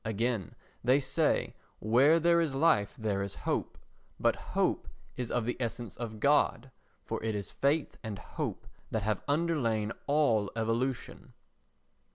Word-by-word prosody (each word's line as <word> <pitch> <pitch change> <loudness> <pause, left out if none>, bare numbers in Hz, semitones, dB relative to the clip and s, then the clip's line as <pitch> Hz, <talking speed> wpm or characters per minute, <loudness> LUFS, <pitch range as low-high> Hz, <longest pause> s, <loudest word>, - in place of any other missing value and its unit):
Again, 110 -1 -1 0.3
they 130 +3 +5
say, 130 - +1 0.2
"Where 130 +9 +4
there 170 +1 +4
is 150 -5 -1
life 135 -9 +3
there 105 -3 -1
is 100 0 -4
hope," - - -1 0.4
but - - +3 0.2
hope - - +1 0.3
is 125 -2 -4
of 120 -2 0
the 120 - -1
essence 120 -3 -4
of 110 -2 -6
God, 135 -1 +2 0.3
for - - -4
it 110 -1 -1
is 100 -1 -4
faith 145 +3 0
and 110 -3 -4
hope - - -5 0.2
that 110 -2 -1
have 105 -1 0
underlain 140 -9 +1 0.2
all 140 -9 +3
evolution. 115 +3 -2
120 Hz, 145 wpm, -31 LUFS, 110-140 Hz, 0.4 s, they